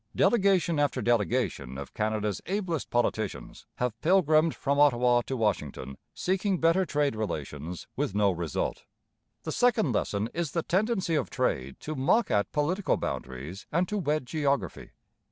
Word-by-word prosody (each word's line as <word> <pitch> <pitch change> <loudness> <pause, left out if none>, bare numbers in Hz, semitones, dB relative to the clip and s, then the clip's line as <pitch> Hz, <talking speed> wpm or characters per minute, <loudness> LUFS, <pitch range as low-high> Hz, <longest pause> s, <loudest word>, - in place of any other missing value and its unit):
Delegation 190 -8 +3
after 145 -3 +1
delegation 115 - 0
of 70 -1 -8
Canada's 105 -1 -1
ablest 185 -5 -2
politicians 110 -4 -2
have 120 -2 -3
pilgrimed 160 -3 +4
from 140 0 0
Ottawa 125 -4 +4
to 135 - -2
Washington, 75 - -2 0.2
seeking 190 0 0
better 165 +3 +3
trade 145 -5 +1
relations, 80 -5 -5
with 100 - -2
no 100 -1 +3
result. 85 -3 -3 0.6
The - - -3
second 235 - +2
lesson 105 -1 -1
is 170 -3 -2
the 170 - 0
tendency 190 -2 0
of 150 - 0
trade 65 +1 -2
to 155 - -4
mock 150 - +2
at 105 -1 +1
political 170 +7 0
boundaries 70 +9 -5
and 175 +3 +1
to 210 -1 -1
wed 150 -5 0
geography. 140 - -1
135 Hz, 145 wpm, -28 LUFS, 105-170 Hz, 0.6 s, pilgrimed